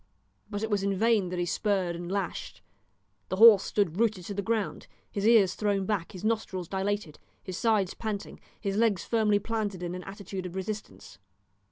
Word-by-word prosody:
But 205 Hz, 0 st, -4 dB
it 220 Hz, -, -2 dB
was 205 Hz, -1 st, +2 dB
in 200 Hz, 0 st, 0 dB
vain 220 Hz, -3 st, +3 dB
that 180 Hz, -, -4 dB
he 175 Hz, -, 0 dB
spurred 185 Hz, -2 st, 0 dB
and 175 Hz, +1 st, -6 dB
lashed. 195 Hz, -3 st, -4 dB, 0.7 s
The -, -, -1 dB
horse 215 Hz, -1 st, +9 dB
stood 200 Hz, -4 st, -1 dB
rooted 215 Hz, -6 st, +1 dB
to 205 Hz, -, -4 dB
the 200 Hz, -, -2 dB
ground, 220 Hz, +1 st, -2 dB, 0.2 s
his 205 Hz, +1 st, 0 dB
ears 215 Hz, -5 st, +6 dB
thrown 200 Hz, -2 st, 0 dB
back, 185 Hz, -5 st, -2 dB
his 185 Hz, -, -9 dB
nostrils 215 Hz, -5 st, -1 dB
dilated, 195 Hz, -3 st, -2 dB, 0.2 s
his 185 Hz, -, -6 dB
sides 215 Hz, -5 st, +2 dB
panting, 215 Hz, -3 st, -5 dB, 0.2 s
his 200 Hz, -1 st, -2 dB
legs 220 Hz, -5 st, +2 dB
firmly 215 Hz, -3 st, +3 dB
planted 205 Hz, -3 st, -3 dB
in 175 Hz, 0 st, -3 dB
an 180 Hz, 0 st, -6 dB
attitude 195 Hz, -1 st, -6 dB
of 180 Hz, -, -10 dB
resistance. 190 Hz, -, -6 dB
200 Hz, 185 wpm, -28 LUFS, 185-215 Hz, 0.7 s, horse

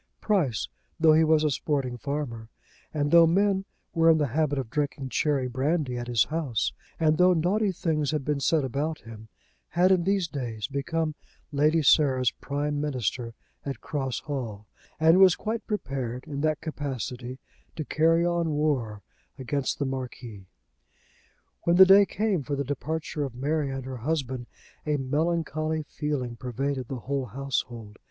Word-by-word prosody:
Price, 165 Hz, -, +1 dB, 0.3 s
though 160 Hz, -1 st, +6 dB
he 160 Hz, +1 st, +5 dB
was 155 Hz, -1 st, +4 dB
a 150 Hz, -, +2 dB
sporting 135 Hz, -3 st, -1 dB
farmer, 120 Hz, -4 st, -4 dB, 0.4 s
and 145 Hz, -1 st, -1 dB
though 170 Hz, -1 st, +8 dB
men 195 Hz, +2 st, +2 dB, 0.3 s
were 165 Hz, -1 st, +4 dB
in 160 Hz, -, +6 dB
the 145 Hz, -3 st, 0 dB
habit 150 Hz, -2 st, +1 dB
of 125 Hz, -4 st, -4 dB
drinking 140 Hz, -2 st, -2 dB
cherry 140 Hz, -2 st, +1 dB
brandy 135 Hz, +1 st, 0 dB
at 120 Hz, 0 st, -4 dB
his 120 Hz, -3 st, +3 dB
house, 150 Hz, -8 st, -1 dB, 0.3 s
and 155 Hz, -1 st, +3 dB
though 180 Hz, 0 st, +6 dB
naughty 195 Hz, +5 st, +1 dB
things 155 Hz, -5 st, -1 dB
had 150 Hz, -4 st, -1 dB
been 150 Hz, -1 st, 0 dB
said 155 Hz, +2 st, +2 dB
about 145 Hz, +5 st, -2 dB
him, 110 Hz, -1 st, -11 dB, 0.4 s
had 180 Hz, +2 st, +3 dB
in 185 Hz, -2 st, +4 dB
these 195 Hz, -1 st, +1 dB
days 120 Hz, -8 st, -4 dB
become 155 Hz, +4 st, -2 dB, 0.4 s
Lady 155 Hz, +2 st, +3 dB
Sarah's 130 Hz, -3 st, +4 dB
prime 145 Hz, +1 st, -3 dB
minister 125 Hz, -4 st, -2 dB, 0.3 s
at 140 Hz, -1 st, -5 dB
Cross 135 Hz, -4 st, -3 dB
Hall, 120 Hz, -8 st, -5 dB, 0.3 s
and 160 Hz, +3 st, +6 dB
was 190 Hz, -2 st, +7 dB
quite 220 Hz, +1 st, -4 dB
prepared 130 Hz, -, -3 dB
in 145 Hz, -2 st, -4 dB
that 155 Hz, 0 st, 0 dB
capacity 130 Hz, -4 st, -5 dB, 0.4 s
to 155 Hz, -, -4 dB
carry 165 Hz, +3 st, +3 dB
on 170 Hz, -1 st, +1 dB
war 135 Hz, -9 st, -1 dB, 0.3 s
against 130 Hz, +1 st, -2 dB
the 140 Hz, -, -1 dB
Marquis. 125 Hz, -6 st, -6 dB, 1.1 s
When 170 Hz, -, +2 dB
the 190 Hz, +1 st, +10 dB
day 195 Hz, +1 st, +7 dB
came 205 Hz, -5 st, 0 dB
for 140 Hz, +2 st, -3 dB
the 140 Hz, -, -1 dB
departure 150 Hz, +2 st, -3 dB
of 135 Hz, -4 st, -5 dB
Mary 145 Hz, +3 st, -1 dB
and 135 Hz, -1 st, -5 dB
her 130 Hz, -1 st, -5 dB
husband, 130 Hz, -2 st, -2 dB, 0.4 s
a 150 Hz, -1 st, 0 dB
melancholy 155 Hz, +2 st, -1 dB
feeling 145 Hz, -6 st, -3 dB
pervaded 130 Hz, +2 st, -3 dB
the 130 Hz, -2 st, -5 dB
whole 140 Hz, +1 st, -2 dB
household. 120 Hz, -4 st, -4 dB
145 Hz, 160 wpm, -27 LUFS, 130-160 Hz, 1.1 s, the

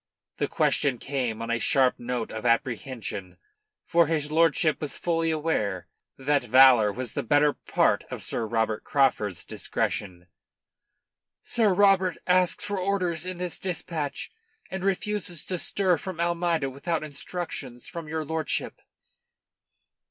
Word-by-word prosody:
The -, -, 0 dB
question 135 Hz, -4 st, +1 dB
came 120 Hz, -4 st, -3 dB
on 115 Hz, -, -3 dB
a 115 Hz, -, +1 dB
sharp 130 Hz, 0 st, +3 dB
note 120 Hz, -1 st, -3 dB
of 110 Hz, -, -6 dB
apprehension, 115 Hz, -6 st, -2 dB, 0.5 s
for 170 Hz, -1 st, +4 dB
his 150 Hz, -2 st, -1 dB
lordship 160 Hz, -1 st, +3 dB
was 150 Hz, -3 st, -3 dB
fully 165 Hz, -1 st, 0 dB
aware 150 Hz, -, -1 dB, 0.3 s
that 140 Hz, +2 st, +1 dB
valour 125 Hz, -3 st, +6 dB
was 125 Hz, +1 st, -5 dB
the -, -, -1 dB
better 145 Hz, +4 st, +3 dB
part -, -, +1 dB
of -, -, -5 dB
Sir 115 Hz, -, -2 dB
Robert 110 Hz, -1 st, 0 dB
Craufurd's 105 Hz, -, +1 dB
discretion. 90 Hz, -3 st, -3 dB, 1.2 s
"Sir 220 Hz, -4 st, +2 dB
Robert 190 Hz, -2 st, +4 dB
asks 180 Hz, -1 st, +2 dB
for 205 Hz, -1 st, -2 dB
orders 180 Hz, -3 st, 0 dB
in 185 Hz, -1 st, -4 dB
this 180 Hz, -1 st, -3 dB
dispatch, 165 Hz, -6 st, -4 dB, 0.4 s
and 190 Hz, -1 st, -4 dB
refuses 195 Hz, -4 st, -2 dB
to 180 Hz, -2 st, -2 dB
stir 185 Hz, -4 st, +1 dB
from 185 Hz, -1 st, -6 dB
Almeida 170 Hz, -4 st, 0 dB
without 155 Hz, +4 st, -2 dB
instructions 145 Hz, -4 st, -6 dB
from 170 Hz, -2 st, -7 dB
your 160 Hz, 0 st, -3 dB
lordship." 160 Hz, +1 st, -2 dB
150 Hz, 135 wpm, -26 LUFS, 125-175 Hz, 1.2 s, valour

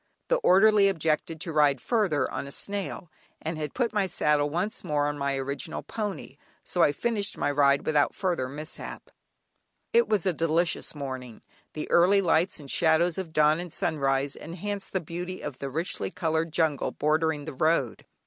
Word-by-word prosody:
The -, -, +4 dB
orderly 205 Hz, -, +5 dB
objected 160 Hz, -3 st, 0 dB
to 165 Hz, -, -3 dB
ride 145 Hz, -3 st, +4 dB
further 185 Hz, -, +1 dB
on -, -, -4 dB
a -, -, -9 dB
snail, 200 Hz, -1 st, -4 dB, 0.3 s
and 160 Hz, 0 st, -4 dB
had 150 Hz, -1 st, -5 dB
put 240 Hz, -3 st, 0 dB
my 205 Hz, -2 st, +1 dB
saddle 150 Hz, -4 st, +1 dB
once 180 Hz, +8 st, -2 dB
more 150 Hz, -4 st, 0 dB
on 145 Hz, -, -2 dB
my 140 Hz, -1 st, -1 dB
original 135 Hz, +1 st, -4 dB
pony, 205 Hz, -, -5 dB, 0.3 s
so 175 Hz, -, -1 dB
I 145 Hz, -, +5 dB
finished 210 Hz, +4 st, -1 dB
my -, -, 0 dB
ride 140 Hz, -1 st, +3 dB
without 150 Hz, -2 st, +2 dB
further 175 Hz, -10 st, -1 dB
mishap. 150 Hz, +3 st, -8 dB, 0.8 s
It 470 Hz, +1 st, +4 dB
was 205 Hz, -5 st, +1 dB
a 185 Hz, -, +2 dB
delicious 165 Hz, +1 st, 0 dB
morning; 130 Hz, -4 st, -7 dB, 0.3 s
the 155 Hz, -, -5 dB
early 185 Hz, +4 st, +5 dB
lights 175 Hz, -1 st, +2 dB
and 145 Hz, -, -11 dB
shadows 165 Hz, +4 st, +2 dB
of 180 Hz, -4 st, -5 dB
dawn 155 Hz, 0 st, +3 dB
and 175 Hz, -1 st, -6 dB
sunrise 140 Hz, -4 st, 0 dB
enhanced 195 Hz, +4 st, -5 dB
the 190 Hz, -, 0 dB
beauty 175 Hz, +3 st, -6 dB
of 145 Hz, -3 st, -6 dB
the 140 Hz, -, -4 dB
richly 160 Hz, +6 st, -2 dB
coloured 165 Hz, -3 st, -1 dB
jungle 155 Hz, -3 st, +1 dB
bordering 155 Hz, 0 st, 0 dB
the 155 Hz, -, -6 dB
road. 140 Hz, -3 st, +1 dB
160 Hz, 175 wpm, -27 LUFS, 145-185 Hz, 0.8 s, orderly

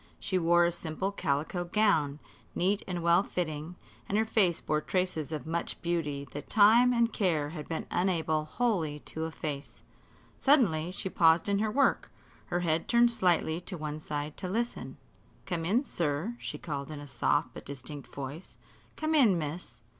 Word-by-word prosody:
She 185 Hz, -, -1 dB
wore 175 Hz, 0 st, +4 dB
a 170 Hz, -, +2 dB
simple 170 Hz, +4 st, -3 dB
calico 160 Hz, 0 st, -1 dB
gown, 175 Hz, -7 st, +2 dB, 0.4 s
neat 195 Hz, +3 st, +1 dB
and 175 Hz, -2 st, -3 dB
well 170 Hz, +2 st, +5 dB
fitting, 165 Hz, -3 st, -4 dB, 0.3 s
and 205 Hz, -, +1 dB
her 220 Hz, -, +3 dB
face 195 Hz, -7 st, +2 dB
bore 155 Hz, 0 st, -1 dB
traces 180 Hz, -4 st, -1 dB
of 150 Hz, -5 st, -4 dB
much 165 Hz, +1 st, -3 dB
beauty 150 Hz, -5 st, -2 dB
that 145 Hz, 0 st, -8 dB
time 230 Hz, +4 st, +6 dB
and 235 Hz, -2 st, +2 dB
care 160 Hz, -7 st, +1 dB
had 150 Hz, -2 st, -8 dB
been 160 Hz, -, -3 dB
unable 160 Hz, -4 st, +1 dB
wholly 160 Hz, -8 st, -1 dB
to 160 Hz, 0 st, -5 dB
efface. 150 Hz, -3 st, -6 dB, 0.6 s
Suddenly 195 Hz, -, +3 dB
she 185 Hz, -, -3 dB
paused 165 Hz, -1 st, +4 dB
in 200 Hz, 0 st, +2 dB
her 215 Hz, +1 st, +1 dB
work, 275 Hz, +5 st, +2 dB, 0.4 s
her 175 Hz, -, -1 dB
head 165 Hz, -1 st, 0 dB
turned 235 Hz, 0 st, +5 dB
slightly 175 Hz, -6 st, +1 dB
to 180 Hz, 0 st, -4 dB
one 150 Hz, -1 st, -4 dB
side 150 Hz, -1 st, -4 dB
to 185 Hz, -, -4 dB
listen. 235 Hz, +5 st, -3 dB, 0.5 s
"Come 170 Hz, -3 st, -2 dB
in, 225 Hz, -, +2 dB
sir," 170 Hz, -, -2 dB
she -, -, -5 dB
called 140 Hz, -3 st, -5 dB
in 155 Hz, -2 st, -6 dB
a 145 Hz, -, -8 dB
soft 135 Hz, +2 st, 0 dB
but -, -, -9 dB
distinct 140 Hz, +1 st, -8 dB
voice; 140 Hz, +6 st, -7 dB, 0.4 s
"come 310 Hz, +1 st, -1 dB
in, 235 Hz, -, +5 dB
miss." 150 Hz, -6 st, -6 dB
170 Hz, 170 wpm, -30 LUFS, 150-195 Hz, 0.6 s, time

